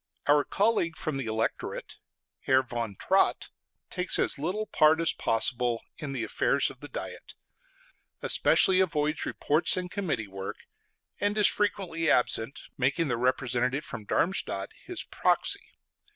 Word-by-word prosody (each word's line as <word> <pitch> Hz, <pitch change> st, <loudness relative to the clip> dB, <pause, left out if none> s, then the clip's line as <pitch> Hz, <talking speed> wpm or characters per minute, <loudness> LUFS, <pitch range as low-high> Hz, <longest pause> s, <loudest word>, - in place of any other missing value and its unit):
Our 145 Hz, 0 st, +4 dB
colleague 195 Hz, -5 st, 0 dB
from 155 Hz, -4 st, -3 dB
the 135 Hz, -4 st, -4 dB
Electorate, 110 Hz, 0 st, -3 dB, 0.5 s
Herr 130 Hz, 0 st, +4 dB
von 120 Hz, -4 st, -5 dB
Trott, 190 Hz, -, +1 dB, 0.4 s
takes 180 Hz, 0 st, +2 dB
as -, -, 0 dB
little 185 Hz, +8 st, -2 dB
part 155 Hz, -4 st, +4 dB
as 165 Hz, -, +2 dB
possible 120 Hz, +1 st, 0 dB, 0.2 s
in 145 Hz, -2 st, -5 dB
the 130 Hz, -4 st, -3 dB
affairs -, -, +1 dB
of -, -, -16 dB
the -, -, -9 dB
Diet; -, -, -8 dB, 0.9 s
especially 185 Hz, -1 st, +5 dB
avoids 155 Hz, -4 st, 0 dB
reports 155 Hz, +5 st, +3 dB
and 180 Hz, -1 st, -4 dB
committee 155 Hz, -, -2 dB
work; 95 Hz, 0 st, -7 dB, 0.6 s
and 205 Hz, +1 st, 0 dB
is 210 Hz, -, +5 dB
frequently 180 Hz, -6 st, 0 dB
absent, 120 Hz, 0 st, +1 dB, 0.2 s
making 140 Hz, +5 st, +1 dB
the 120 Hz, -, 0 dB
representative 125 Hz, +2 st, 0 dB
from 110 Hz, -, -8 dB
Darmstadt 100 Hz, -, -1 dB
his -, -, -5 dB
proxy. -, -, 0 dB
150 Hz, 135 wpm, -28 LUFS, 120-180 Hz, 0.9 s, especially